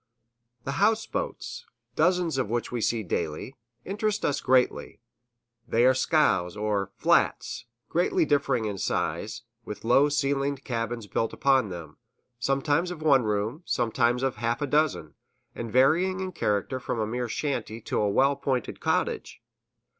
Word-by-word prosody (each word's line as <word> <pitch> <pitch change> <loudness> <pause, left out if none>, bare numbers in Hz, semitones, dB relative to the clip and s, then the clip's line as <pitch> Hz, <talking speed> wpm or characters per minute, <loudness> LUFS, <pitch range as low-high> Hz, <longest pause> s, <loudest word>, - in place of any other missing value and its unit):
The 135 +2 -3
houseboats, 225 - -1 0.3
dozens 170 -3 +2
of 125 - -1
which 120 +1 -2
we 120 -2 -2
see 115 0 0
daily, 85 - -3 0.3
interest 210 +2 -1
us 145 -1 0
greatly. 130 -1 +1 0.7
They 115 +2 +3
are 130 - +6
scows, 105 - +2
or 105 -2 -1
"flats," - - +1 0.2
greatly 175 0 +1
differing 140 -6 +1
in 100 -2 -3
size, - - -2 0.2
with 105 - -8
low 135 +5 +5
ceilinged 140 -1 0
cabins 115 -2 -3
built 115 +2 -2
upon 135 -6 +2
them 85 -4 -8 0.4
sometimes 145 +6 +1
of 165 -3 -7
one 135 -6 +4
room, 105 +8 -1
sometimes 120 +1 +1
of 135 -2 -1
half 115 0 -1
a 145 - 0
dozen, 145 - 0 0.4
and 115 -2 -6
varying 165 - +3
in 190 -1 -3
character 105 - -1
from 120 - -3
a 110 - +1
mere 120 +2 -3
shanty 125 -4 -3
to 110 - -1
a 105 - +2
well 135 +7 +4
appointed 135 -3 -2
cottage. - - -1
130 Hz, 145 wpm, -27 LUFS, 115-150 Hz, 0.7 s, are